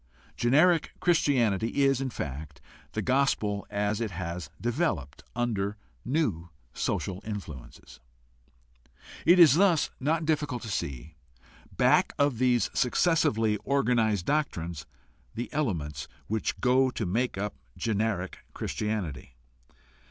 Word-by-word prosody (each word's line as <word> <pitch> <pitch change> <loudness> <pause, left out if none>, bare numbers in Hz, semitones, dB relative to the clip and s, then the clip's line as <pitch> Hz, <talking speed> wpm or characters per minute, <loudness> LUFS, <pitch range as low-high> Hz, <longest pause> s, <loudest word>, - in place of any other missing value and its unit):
Generic 155 +7 +3
Christianity 125 - +2
is, 135 -1 +3
in 135 - -1
fact, 75 - -6 0.3
the - - -2
gospel 125 -6 +1
as 105 +1 -1
it 115 - -1
has 85 -3 -5
developed 115 - -1
under 105 -4 -1 0.3
new 115 - -1 0.2
social 95 0 -2
influences. 75 - -8 1.3
It 175 +2 +7
is 165 -6 +8
thus 175 -2 +3
not 155 +4 0
difficult 150 -6 -1
to 110 - -6
see, 70 -2 -4 0.5
back - - +3
of 140 -5 +2
these 125 -2 +2
successively 115 -6 +2
organized 115 -6 +1
doctrines, 85 - -2 0.5
the 120 - -5
elements 85 - -2 0.2
which 110 0 -2
go 130 +1 +3
to 120 -3 -3
make 115 +5 -1
up 105 +1 -2 0.2
generic 110 -4 -1 0.2
Christianity. 90 - -3
110 Hz, 110 wpm, -28 LUFS, 95-135 Hz, 1.3 s, is